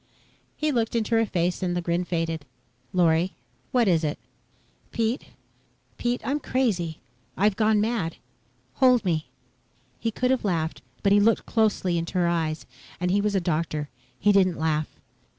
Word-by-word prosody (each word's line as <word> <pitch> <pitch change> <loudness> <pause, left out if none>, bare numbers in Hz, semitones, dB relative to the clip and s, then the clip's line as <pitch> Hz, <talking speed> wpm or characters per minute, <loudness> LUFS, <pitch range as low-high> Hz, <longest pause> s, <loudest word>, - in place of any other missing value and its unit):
He 305 0 0
looked 230 -3 0
into 230 0 0
her 225 -1 +3
face 175 0 0
and 175 -1 0
the - - +1
grin 170 +1 0
faded. 165 -3 -2 0.5
"Lorry, 175 0 +2 0.4
what 245 -3 +3
is 170 -3 +3
it?" 150 -1 -1 0.7
"Pete 230 +2 -1 0.7
Pete. 245 0 0
I'm 280 +5 0
crazy. 195 - 0 0.4
I've 205 0 +3
gone 215 0 +3
mad. 210 -7 -1 0.6
Hold 250 -4 +5
me." 160 -5 0 0.7
He 230 - 0
could 250 +3 0
have 260 - +1
laughed, 165 -5 -1 0.2
but 200 - +3
he 205 - +6
had 205 - +4
looked 230 - +3
closely 205 -6 +1
into 165 +3 -5
her 175 -1 +3
eyes 160 -2 -1 0.3
and 180 0 0
he 200 +2 +3
was 210 0 0
a - - +4
doctor. 155 -3 -1 0.3
He 205 - +3
didn't 185 -3 +3
laugh. 155 -1 0
185 Hz, 165 wpm, -25 LUFS, 165-225 Hz, 0.7 s, he